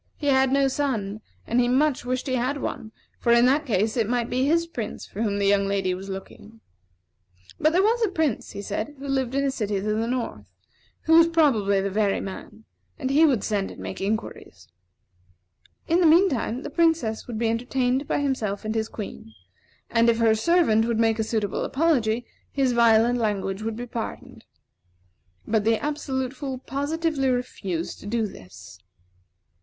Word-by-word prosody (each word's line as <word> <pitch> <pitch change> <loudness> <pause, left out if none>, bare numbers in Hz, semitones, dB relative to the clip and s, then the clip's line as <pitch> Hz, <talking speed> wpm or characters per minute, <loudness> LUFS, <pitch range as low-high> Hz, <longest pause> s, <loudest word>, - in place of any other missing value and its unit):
He 295 - -6
had 265 -1 +3
no 275 0 +3
son, 225 -7 -2 0.2
and 235 - +1
he 245 - +3
much 265 +1 +1
wished 255 +1 -2
he 265 - -2
had 255 +3 0
one; 220 - -5 0.3
for 235 - +1
in 235 +1 +6
that 285 +4 +2
case 215 -1 +1
it 225 -3 0
might 240 -1 -1
be 255 +2 +1
his 335 +2 +2
Prince 240 -10 -6
for 205 - -7
whom 205 -3 0
the 200 - 0
young 200 0 +3
lady 195 -2 0
was 190 +2 -7
looking. 205 +3 -9 1.0
But 310 - +3
there 365 +3 +3
was 460 +3 +2
a 435 - +2
prince, 315 - -1
he 200 - -6
said, 215 +8 -4
who 280 +1 -8
lived 265 -2 -1
in 275 - +1
a 275 - +1
city 210 -5 -2
to 210 +2 -1
the 225 +2 -1
north, 245 -1 -4 0.5
who 320 - +3
was 335 0 +7
probably 230 -13 +2
the 200 0 -2
very 205 0 +1
man; 210 +3 -8 0.3
and 265 -2 -2
he 315 +3 +5
would 255 -8 +1
send 205 -3 -1
and - - -11
make - - -6
inquiries. 195 - -4 1.2
In 340 +2 +3
the 340 - +5
mean 350 +5 +6
time, 250 -1 -2
the - - -6
Princess 315 -9 +1
would 235 -3 -5
be 230 0 0
entertained 250 +3 0
by - - 0
himself 220 -8 -2
and 215 - -1
his 220 -1 -2
Queen; 110 - -8 0.5
and, 230 0 +3
if 230 - +3
her 230 -1 +4
servant 225 -3 +3
would 230 -1 -1
make 225 0 +2
a - - +2
suitable 215 -3 -2
apology, 245 -7 +1 0.3
his 270 -3 +1
violent 235 0 +4
language 200 -3 -1
would 220 0 -3
be 240 +2 -5
pardoned. 230 -1 -7 1.0
But 220 -2 +1
the 225 +1 +3
Absolute 265 -3 -3
Fool 270 -2 -5
positively 285 +1 -1
refused 195 -9 -3
to - - -10
do 225 +1 0
this. 95 - -12
235 Hz, 190 wpm, -24 LUFS, 215-275 Hz, 1.2 s, was